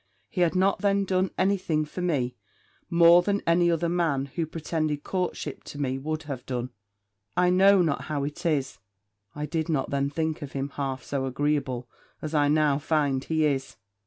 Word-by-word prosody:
He 180 Hz, -, -2 dB
had 175 Hz, 0 st, +2 dB
not 190 Hz, +2 st, +2 dB
then 200 Hz, 0 st, +2 dB
done 185 Hz, 0 st, +1 dB
any 200 Hz, +1 st, +3 dB
thing 155 Hz, -4 st, -1 dB
for 165 Hz, +4 st, -7 dB
me 140 Hz, -9 st, 0 dB, 0.5 s
more 170 Hz, +1 st, +7 dB
than 200 Hz, +2 st, -1 dB
any 175 Hz, +1 st, +4 dB
other 170 Hz, 0 st, +1 dB
man, 165 Hz, -6 st, +1 dB
who 160 Hz, +4 st, -3 dB
pretended 155 Hz, -2 st, -2 dB
courtship 180 Hz, -6 st, -3 dB
to 145 Hz, -, -8 dB
me, 135 Hz, -2 st, -1 dB
would 155 Hz, +3 st, -3 dB
have 135 Hz, -5 st, -6 dB
done. 125 Hz, -1 st, -3 dB, 0.7 s
I 180 Hz, 0 st, +4 dB
know 190 Hz, +1 st, +6 dB
not 140 Hz, -6 st, -1 dB
how 145 Hz, -2 st, -2 dB
it 150 Hz, +5 st, -5 dB
is, 145 Hz, -8 st, 0 dB, 0.6 s
I 150 Hz, 0 st, -3 dB
did 160 Hz, +1 st, -2 dB
not 145 Hz, -4 st, 0 dB
then 140 Hz, 0 st, 0 dB
think 160 Hz, +1 st, -2 dB
him 140 Hz, -1 st, -4 dB
half 135 Hz, -2 st, -4 dB
so 135 Hz, -2 st, -2 dB
agreeable 135 Hz, -2 st, -1 dB, 0.3 s
as 155 Hz, 0 st, -5 dB
I 145 Hz, -1 st, +3 dB
now 150 Hz, -1 st, +3 dB
find 145 Hz, -4 st, 0 dB
he 160 Hz, -1 st, +1 dB
is. 135 Hz, -4 st, -1 dB
155 Hz, 185 wpm, -26 LUFS, 140-175 Hz, 0.7 s, more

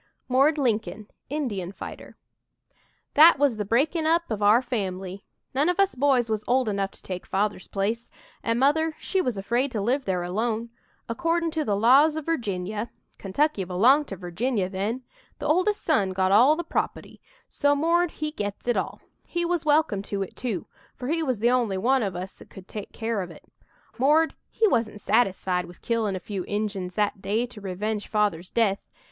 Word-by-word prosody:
"MORD" 275 Hz, +5 st, +3 dB
LINCOLN, 220 Hz, -5 st, -1 dB, 0.2 s
INDIAN 210 Hz, -, -3 dB
FIGHTER -, -, -9 dB, 1.0 s
"That 315 Hz, +1 st, +8 dB
was 275 Hz, -5 st, +2 dB
the 210 Hz, -, -2 dB
breaking 310 Hz, -, +1 dB
up 335 Hz, -3 st, +1 dB
of 215 Hz, -1 st, -2 dB
our 210 Hz, +3 st, +6 dB
family. 195 Hz, -5 st, -4 dB, 0.3 s
None 285 Hz, +6 st, +2 dB
of 360 Hz, +2 st, -1 dB
us 395 Hz, 0 st, +3 dB
boys 260 Hz, -3 st, +2 dB
was 215 Hz, -1 st, -2 dB
old 255 Hz, -1 st, +2 dB
enough 200 Hz, -2 st, 0 dB
to -, -, -12 dB
take 180 Hz, -1 st, -5 dB
Father's 200 Hz, -1 st, -1 dB
place, 215 Hz, +4 st, -2 dB, 0.3 s
an' 230 Hz, 0 st, 0 dB
Mother 310 Hz, +5 st, +2 dB
she 380 Hz, -, 0 dB
was 250 Hz, -, -2 dB
afraid 240 Hz, +7 st, 0 dB
to 220 Hz, -, -1 dB
live 255 Hz, +7 st, 0 dB
there 180 Hz, -2 st, -1 dB
alone. 225 Hz, +5 st, -2 dB, 0.4 s
Accordin' 330 Hz, +6 st, 0 dB
to 315 Hz, -1 st, -1 dB
the 210 Hz, -7 st, 0 dB
laws 270 Hz, +9 st, +5 dB
o' -, -, -1 dB
Virginia 215 Hz, -, -2 dB, 0.3 s
Kentucky 210 Hz, +3 st, 0 dB
belonged 240 Hz, +12 st, +4 dB
to 195 Hz, -, -5 dB
Virginia 195 Hz, +4 st, -1 dB
then 210 Hz, +7 st, -3 dB, 0.3 s
the -, -, -6 dB
oldest 370 Hz, +6 st, +2 dB
son 200 Hz, -, +2 dB
got 185 Hz, 0 st, +1 dB
all 250 Hz, +9 st, +6 dB
the 345 Hz, -, -3 dB
proputty, 330 Hz, -, -3 dB, 0.3 s
so 285 Hz, 0 st, +2 dB
'Mord' 335 Hz, +4 st, +2 dB
he 305 Hz, -1 st, -4 dB
gets 205 Hz, -5 st, -5 dB
it 240 Hz, -, +2 dB
all. -, -, -3 dB, 0.3 s
He 345 Hz, -1 st, -1 dB
was 340 Hz, -2 st, -1 dB
welcome 295 Hz, -9 st, +3 dB
to 200 Hz, -1 st, -3 dB
it 190 Hz, -, -10 dB
too, 225 Hz, -9 st, -3 dB, 0.3 s
for 250 Hz, -, -5 dB
he 330 Hz, +1 st, +1 dB
was 260 Hz, -6 st, 0 dB
the 235 Hz, +4 st, +2 dB
only 235 Hz, -6 st, +1 dB
one 255 Hz, +7 st, +2 dB
of 195 Hz, -4 st, -2 dB
us 185 Hz, +2 st, -5 dB
that -, -, -16 dB
could 190 Hz, 0 st, -13 dB
take 210 Hz, -2 st, -7 dB
care 225 Hz, -2 st, -2 dB
of 180 Hz, -, -6 dB
it. 165 Hz, -, -14 dB, 0.5 s
'Mord' 305 Hz, +5 st, +4 dB, 0.2 s
he 445 Hz, -, +2 dB
wasn't 225 Hz, -, 0 dB
satisfied 190 Hz, -5 st, +1 dB
with 175 Hz, 0 st, -15 dB
killin' 225 Hz, -4 st, 0 dB
a -, -, -3 dB
few 195 Hz, 0 st, -5 dB
Injuns 200 Hz, -3 st, -3 dB
that 205 Hz, -2 st, 0 dB
day 220 Hz, +5 st, 0 dB
to 240 Hz, -4 st, -12 dB
revenge 205 Hz, +2 st, -3 dB
Father's 205 Hz, -5 st, 0 dB
death. 205 Hz, -4 st, +2 dB
230 Hz, 190 wpm, -25 LUFS, 195-285 Hz, 1.0 s, That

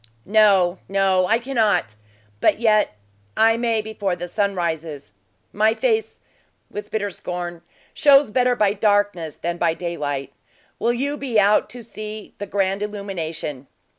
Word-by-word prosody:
"No, 195 Hz, -4 st, +4 dB
no 190 Hz, -2 st, +2 dB
I 225 Hz, -, +3 dB
cannot! 220 Hz, -, +1 dB, 0.5 s
But -, -, +3 dB
yet, 215 Hz, -, +3 dB, 0.4 s
I 225 Hz, 0 st, +5 dB
may 230 Hz, -2 st, 0 dB
before 205 Hz, -4 st, -2 dB
the 175 Hz, 0 st, -6 dB
sun 200 Hz, +2 st, -1 dB
rises. 160 Hz, -, -4 dB, 0.4 s
My 215 Hz, +2 st, +3 dB
face" 445 Hz, -, -1 dB, 0.5 s
with 210 Hz, 0 st, -6 dB
bitter 205 Hz, -2 st, -2 dB
scorn 175 Hz, -1 st, -5 dB, 0.3 s
"shows 280 Hz, -5 st, +5 dB
better 250 Hz, +1 st, +2 dB
by 210 Hz, -4 st, +2 dB
darkness 205 Hz, -6 st, +1 dB
than 170 Hz, +1 st, -3 dB
by 165 Hz, -2 st, +2 dB
daylight. 145 Hz, -6 st, -4 dB, 0.5 s
Will 235 Hz, -, +2 dB
you 280 Hz, +4 st, -2 dB
be 255 Hz, -6 st, +1 dB
out 205 Hz, +1 st, +3 dB
to 245 Hz, -1 st, -9 dB
see, 215 Hz, -1 st, -8 dB
the 205 Hz, -, -5 dB
grand 195 Hz, 0 st, 0 dB
illumination." 170 Hz, -9 st, -5 dB
205 Hz, 140 wpm, -22 LUFS, 175-220 Hz, 0.5 s, I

